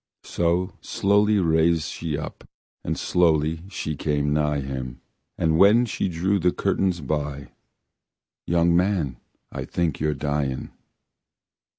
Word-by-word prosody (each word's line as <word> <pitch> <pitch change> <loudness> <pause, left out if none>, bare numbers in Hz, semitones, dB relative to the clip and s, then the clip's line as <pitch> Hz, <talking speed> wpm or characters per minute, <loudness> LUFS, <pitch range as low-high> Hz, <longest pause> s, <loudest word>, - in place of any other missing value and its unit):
So 85 +1 0
slowly, 105 +2 +2
slowly - - +3
rase 80 -2 +2
she 80 -3 -4
up, - - -8 0.3
And - - -2
slowly 80 -2 +2
she 80 -5 -4
came 75 0 0
nigh 75 -1 +1
him, 65 -1 -5 0.4
And 80 0 +1
when 110 +5 +6
she 105 - -2
drew 95 +4 0
the 90 0 +2
curtains 95 -2 0
by 70 0 -3 1.0
"Young 85 0 +3
man, 90 -8 +1 0.3
I - - -5
think 85 -4 -2
you're 75 0 0
dyin'." 70 -2 -2
80 Hz, 125 wpm, -24 LUFS, 75-90 Hz, 1.0 s, when